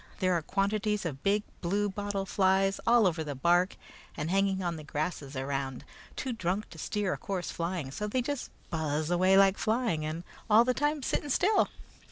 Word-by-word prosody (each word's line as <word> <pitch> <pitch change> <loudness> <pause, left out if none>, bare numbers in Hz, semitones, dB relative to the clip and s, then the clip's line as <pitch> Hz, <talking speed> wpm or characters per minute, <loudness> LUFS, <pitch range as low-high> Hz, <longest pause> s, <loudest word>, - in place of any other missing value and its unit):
There 185 -1 +2
are 170 - +1
quantities 200 +3 0
of 140 -5 -4
big 205 +3 +2 0.2
blue 200 +4 +1
bottle 200 0 -3
flies 195 0 +2
over 195 -9 +4
the 145 -2 -5
bark 175 +6 +2 0.4
and 150 +3 -2
hanging 195 -1 +2
on 170 -1 -1
the 155 - -8
grasses 150 -2 -3
around, 135 -1 -3 0.3
too 260 - -3
drunk 195 0 -2
to 160 - -11
steer 205 +1 -1
a - - -6
course 195 -6 -3
flying; 170 -5 -3
so 210 +9 -3
they 250 +4 0
just 285 +1 -3 0.2
buzz 155 -1 -1
away 185 +2 +4
like 195 0 +5
flying, 220 -8 0
and 155 +2 -4 0.3
all 220 +2 +7
the 255 +1 +1
time 295 +1 0
sitting 290 - -1
still. 395 +10 +3
190 Hz, 185 wpm, -30 LUFS, 160-210 Hz, 0.4 s, all